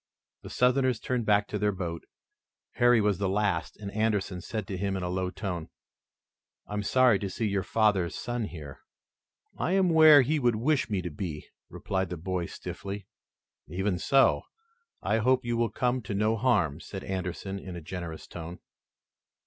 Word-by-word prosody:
The - - -9
Southerners 125 -1 +2
turned 125 -2 -2
back 105 -1 +3
to 105 - -2
their 105 0 +2
boat. 85 -3 -5 0.7
Harry 120 -1 +5
was 105 -3 +1
the 100 -2 0
last 95 -5 0
and 100 -2 -7
Anderson 105 -4 0
said 110 +4 -4
to 100 - -5
him 100 0 -1
in 95 - -4
a 90 - -2
low 90 0 -1
tone: 90 -4 -5 1.0
"I - - -9
am 105 - -1
sorry 120 +1 +4
to 100 - -3
see 115 - -2
your 100 -1 0
father's 95 -4 +1
son 120 -2 -3
here." 75 -8 -9 0.8
"I 180 - 0
am 190 -2 +3
where 155 -3 +8
he 150 +4 +1
would 120 -4 +2
wish 140 +3 +1
me 100 -4 -1
to 90 - -4
be," 75 -1 -5 0.2
replied 95 -2 -2
the 90 - -4
boy 90 0 -2
stiffly. 100 0 -7 0.6
"Even 95 +2 -1
so, 135 +7 +4 0.6
I 110 +2 +2
hope 130 +2 +2
you 120 0 0
will 115 -1 +1
come 125 +3 0
to 100 -2 -5
no 110 +2 +2
harm," 100 - +1
said 95 +2 -8
Anderson 95 +1 -4
in 95 -2 -8
a - - -5
generous 85 0 -6
tone. 85 +1 -8
100 Hz, 180 wpm, -28 LUFS, 90-120 Hz, 1.0 s, where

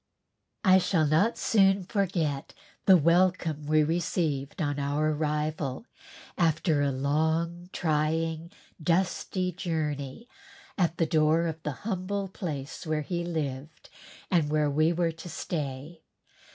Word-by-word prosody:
I 190 -2 +6
shall 170 -3 +2
not 160 +10 +2
soon 195 -2 +3
forget 175 -8 -1 0.3
the 190 -2 +9
welcome 170 -2 +2
we 155 0 +4
received 160 -3 -1
on 145 -3 -1
our 145 +2 0
arrival 150 - -2 0.5
after 160 -2 +2
a 140 - +2
long 160 +6 0
trying 160 +1 -1 0.3
dusty 185 +2 0
journey, 155 - -3 0.5
at 175 -3 0
the 165 - +2
door 160 +1 +3
of 160 -1 -4
the 150 +3 -6
humble 195 -1 -2
place 155 -4 -6
where 155 -1 0
he 175 +3 -3
lived 155 -3 -5 0.4
and 165 -5 +3
where 150 -1 +1
we 155 +3 +3
were 170 -1 +1
to 165 +2 -10
stay. 150 0 -5
160 Hz, 125 wpm, -28 LUFS, 150-175 Hz, 0.5 s, the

